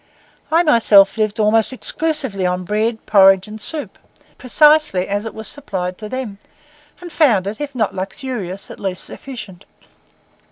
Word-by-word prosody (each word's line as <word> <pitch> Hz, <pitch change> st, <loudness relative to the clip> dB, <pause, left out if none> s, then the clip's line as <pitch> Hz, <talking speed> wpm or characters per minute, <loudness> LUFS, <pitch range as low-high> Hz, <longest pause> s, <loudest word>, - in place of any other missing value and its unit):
I 330 Hz, +2 st, +4 dB
myself 210 Hz, -, +5 dB
lived 215 Hz, 0 st, -1 dB
almost 215 Hz, +2 st, +3 dB
exclusively 265 Hz, -6 st, -2 dB
on 180 Hz, 0 st, -1 dB
bread, 220 Hz, +4 st, -2 dB
porridge, 195 Hz, -2 st, +5 dB
and 215 Hz, 0 st, -9 dB
soup, 310 Hz, +4 st, -5 dB, 0.4 s
precisely 295 Hz, -6 st, +3 dB
as 205 Hz, +2 st, -3 dB
it -, -, -9 dB
was 220 Hz, 0 st, -7 dB
supplied 185 Hz, -10 st, -5 dB
to 215 Hz, -1 st, -7 dB
them, 245 Hz, -6 st, -6 dB, 0.6 s
and 350 Hz, -1 st, -10 dB
found 240 Hz, -, +3 dB
it, 210 Hz, +7 st, -5 dB
if 285 Hz, -2 st, -5 dB
not 220 Hz, -5 st, -1 dB
luxurious, 195 Hz, 0 st, -5 dB
at -, -, -11 dB
least 190 Hz, -2 st, -4 dB
sufficient. 215 Hz, -9 st, -10 dB
215 Hz, 150 wpm, -18 LUFS, 195-265 Hz, 0.6 s, myself